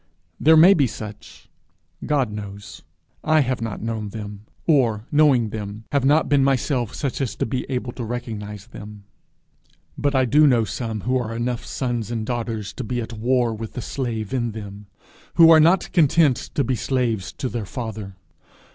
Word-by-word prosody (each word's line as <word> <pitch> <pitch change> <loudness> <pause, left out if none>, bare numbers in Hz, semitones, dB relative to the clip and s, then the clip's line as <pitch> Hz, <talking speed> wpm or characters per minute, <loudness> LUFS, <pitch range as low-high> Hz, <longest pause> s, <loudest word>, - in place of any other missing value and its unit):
There 160 +2 +6
may 175 +5 +8
be 145 -8 +2
such 105 -2 -10 0.6
God 135 -7 +1
knows; 100 -1 -8 0.4
I 155 0 +4
have 130 -3 -1
not 115 -2 -4
known 110 -2 -3
them; 105 0 -8 0.2
or, 120 -9 +2
knowing 140 -7 +4
them, 105 0 -6
have 140 -3 +1
not 145 +4 +3
been 140 -1 +3
myself 130 -3 0
such 140 -1 -3
as 130 - -2
to - - -1
be 125 +3 -3
able 125 -2 -2
to 120 - -6
recognize 110 -3 -6
them. 105 -3 -11 1.0
But 145 -1 0
I 130 -1 +3
do 150 +5 +5
know 120 -4 +4
some 110 +1 -4
who 130 +5 0
are 115 -2 -4
enough 120 0 -2
sons 120 -5 -3
and 115 -2 -3
daughters 115 -3 -3
to 130 - -5
be 120 +2 -3
at 115 0 -5
war 120 +1 +1
with 110 0 -7
the 125 - -5
slave 115 -5 -4
in 120 -4 -1
them, 105 -1 -9 0.5
who 165 -1 +8
are 160 - +8
not 170 +4 +3
content 155 -4 +4 0.2
to 140 - +2
be 130 - -1
slaves 115 -4 -1
to 130 - -4
their 115 -5 -4
father. 110 -5 -6
120 Hz, 180 wpm, -22 LUFS, 110-135 Hz, 1.0 s, may